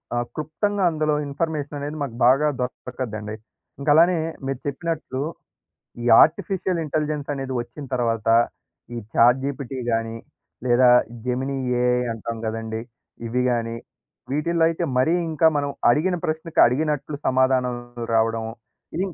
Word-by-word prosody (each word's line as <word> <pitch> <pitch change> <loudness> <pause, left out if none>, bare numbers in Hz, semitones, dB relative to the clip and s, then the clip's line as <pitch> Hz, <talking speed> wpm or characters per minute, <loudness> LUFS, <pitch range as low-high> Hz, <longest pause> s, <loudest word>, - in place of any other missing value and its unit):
ఆహ్, 120 0 0
క్లుప్తంగా 190 +7 -1
అందులో 155 -1 +1
ఇన్ఫర్మేషననేది 145 0 -3
మాకు 125 -5 -5
బాగా 135 +5 +5
దొరొకద్దండి. 120 -4 -4 0.4
ఇంకలానే 160 +5 +5 0.3
మీరు 135 -1 -2
చెప్పినట్టు, 145 -2 -3 0.8
ఈ - - -3 0.2
ఆర్టిఫిషియల్ 180 +1 +1
ఇంటెలిజెన్సనేది 145 -3 -2
వచ్చిన 120 +4 -9
తర్వాత, 115 -3 -1 0.7
ఈ - - -3 0.2
ఛాట్‌జీపిటీ 130 +2 +2
గానీ, 115 0 -1 0.5
లేదా 125 +1 +5 0.4
జెమినీ 130 +2 -1 0.3
ఏఐ 125 0 +2
అంటాం 115 +1 -5
గదండీ! 110 0 -4 0.5
ఇవి 125 +2 0
గాని, 115 -1 -1 0.5
వీటిల్లో 165 +3 +1
అయితే 165 +1 -2
మరీ 145 +6 +3 0.2
ఇంకా 160 +1 +4
మనం 145 0 -2 0.2
అడిగిన 175 +8 +1
ప్రశ్నకి 160 +1 -2
అడిగినట్లు 145 +3 -1
సమాధానం 130 -1 +2 0.4
రావడం. 115 0 +2 0.5
ఈ - - -2
135 Hz, 115 wpm, -23 LUFS, 120-155 Hz, 0.8 s, బాగా